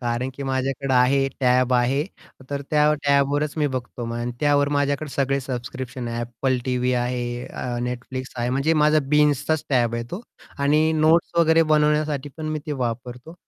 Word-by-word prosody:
कारण, 120 +1 -2
की 140 - -7
माझ्याकडे 135 0 -2
आहे, 135 +2 +3
टॅब 125 0 +3
आहे, 130 +4 +2 0.5
तर 140 0 -3
त्या 150 0 +4
टॅबवरच 140 +1 +2
मी 150 -1 +1
बघतो. 130 -3 -4 0.5
त्यावर 145 -1 +3
माझ्याकडे 145 +1 0
सगळे 135 0 0
सबस्क्रिप्शन 125 -1 -5
आहे. 115 0 -3
Apple 125 +2 -1
टीव्ही 125 -1 0
आहे, 120 0 -2
अ, - - -8 0.3
Netflix 130 +1 -6
आहे. 120 0 -1
म्हणजे 140 +5 +1
माझा 155 0 +4
बिंझचाच 150 +1 +2
टॅब 120 -3 +2
आहे 115 0 -3
तो. 190 +6 -5 0.4
आणि 150 +3 +3
नोट्स 160 +2 +3
वगैरे 165 0 +5
बनवण्यासाठी 150 -2 +1
पण 155 - -5
मी 155 - -2
ते 150 - -2
वापरतो. 125 +6 -7
135 Hz, 160 wpm, -23 LUFS, 125-150 Hz, 0.5 s, वगैरे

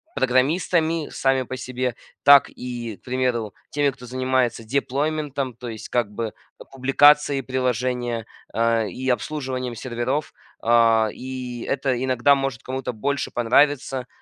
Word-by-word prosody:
программистами 160 +5 +1
сами 135 -1 +1
по 130 - -6
себе, 125 -1 -3 0.3
так 140 0 +8
и, 120 -4 -6
к - - -38
примеру, 125 -5 -1 0.2
теми, 145 -1 +1
кто 130 -2 -13
занимается 130 -2 0
деплойментом, 140 +1 -1
то 120 +1 -8
есть 110 -2 -7
как 120 -4 0
бы, 115 +2 -3
э, - - -15
публикацией 140 +2 +4
приложения, 125 -2 -1 0.3
а, 115 0 +2
и 130 +5 -5
обслуживанием 130 -2 -2
серверов, 130 +5 -3 0.3
а, 115 -1 +4
и 125 -2 -6
это 130 -2 0
иногда 130 +2 +4
может 135 -4 -3
кому-то 130 0 -3
больше 135 +4 -2
понравиться. 130 +1 +2
130 Hz, 130 wpm, -23 LUFS, 120-135 Hz, 0.3 s, так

